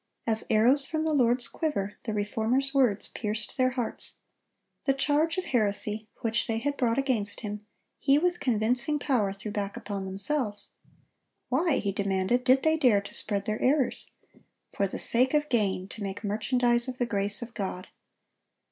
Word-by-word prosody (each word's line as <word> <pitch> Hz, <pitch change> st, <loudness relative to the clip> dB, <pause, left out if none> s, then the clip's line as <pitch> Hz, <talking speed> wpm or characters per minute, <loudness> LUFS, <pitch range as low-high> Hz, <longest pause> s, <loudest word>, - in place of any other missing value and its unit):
As 220 Hz, -1 st, +1 dB
arrows 250 Hz, +6 st, +4 dB
from 315 Hz, 0 st, -2 dB
the 315 Hz, -, +1 dB
Lord's 245 Hz, -3 st, +3 dB
quiver, 210 Hz, -11 st, -3 dB
the 225 Hz, -, -2 dB
Reformer's 225 Hz, +6 st, 0 dB
words 245 Hz, -7 st, +2 dB
pierced 215 Hz, 0 st, -3 dB
their 255 Hz, -2 st, +3 dB
hearts. 240 Hz, -3 st, -3 dB, 0.7 s
The 275 Hz, -, +2 dB
charge 300 Hz, +4 st, +1 dB
of 370 Hz, -, -2 dB
heresy, 215 Hz, -2 st, -1 dB
which 225 Hz, 0 st, 0 dB
they 225 Hz, -, -1 dB
had 285 Hz, +5 st, -1 dB
brought 240 Hz, -3 st, +1 dB
against 240 Hz, -7 st, 0 dB
him, 210 Hz, -1 st, -6 dB, 0.3 s
he 275 Hz, +1 st, +4 dB
with 350 Hz, +3 st, +1 dB
convincing 245 Hz, +4 st, +2 dB
power 245 Hz, -9 st, +1 dB
threw 200 Hz, +2 st, -7 dB
back 205 Hz, +1 st, -3 dB
upon 200 Hz, -4 st, -5 dB
themselves. 205 Hz, +3 st, -2 dB, 0.8 s
Why, 280 Hz, +3 st, +2 dB
he 200 Hz, -, -1 dB
demanded, 195 Hz, +4 st, 0 dB
did 265 Hz, +1 st, +4 dB
they 315 Hz, 0 st, +3 dB
dare 240 Hz, -9 st, +4 dB
to 200 Hz, -, -10 dB
spread 200 Hz, -2 st, -1 dB
their 215 Hz, 0 st, -2 dB
errors? 270 Hz, -1 st, +1 dB, 0.7 s
For 200 Hz, -, +1 dB
the -, -, -5 dB
sake 255 Hz, +4 st, +3 dB
of 295 Hz, 0 st, +1 dB
gain, 195 Hz, -5 st, 0 dB
to 215 Hz, -, -9 dB
make 200 Hz, +1 st, -5 dB
merchandise 240 Hz, +3 st, +1 dB
of 255 Hz, -1 st, -4 dB
the 245 Hz, -, 0 dB
grace 205 Hz, 0 st, +1 dB
of 235 Hz, 0 st, -10 dB
God. 190 Hz, -3 st, -4 dB
230 Hz, 170 wpm, -28 LUFS, 205-270 Hz, 0.8 s, arrows